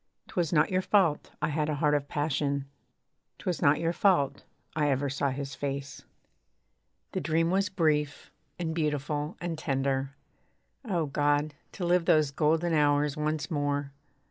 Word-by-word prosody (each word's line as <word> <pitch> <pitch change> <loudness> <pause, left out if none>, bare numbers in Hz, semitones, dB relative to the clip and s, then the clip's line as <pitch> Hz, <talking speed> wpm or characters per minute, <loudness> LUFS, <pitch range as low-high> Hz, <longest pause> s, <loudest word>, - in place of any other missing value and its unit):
'Twas 175 -4 -1
not 150 0 +3
your 185 0 +2
fault 185 -6 +2
I - - +2
had 150 0 0
a 150 - 0
heart 150 0 +2
of 145 -1 0
passion; 140 -1 -1 0.7
'Twas 180 -2 -3
not 145 +1 +4
your 165 +1 0
fault 155 -9 +2 0.3
I 150 -2 +2
ever 135 0 0
saw 140 0 0
his 140 +1 -4
face. 140 0 -5 1.1
The - - -2
dream 165 +1 +1
was 195 +1 +2
brief, 150 -5 0 0.3
and 165 -2 -2
beautiful, 150 0 -2
and 170 -2 -4
tender, 135 -1 -1 0.7
(O 180 - 0
God! 145 +1 +1 0.2
to 180 - -4
live 175 0 +3
those 155 -4 +4
golden 160 +4 +1
hours 145 -1 +3
once 155 0 -2
more. 145 -2 -1
150 Hz, 150 wpm, -29 LUFS, 145-165 Hz, 1.1 s, not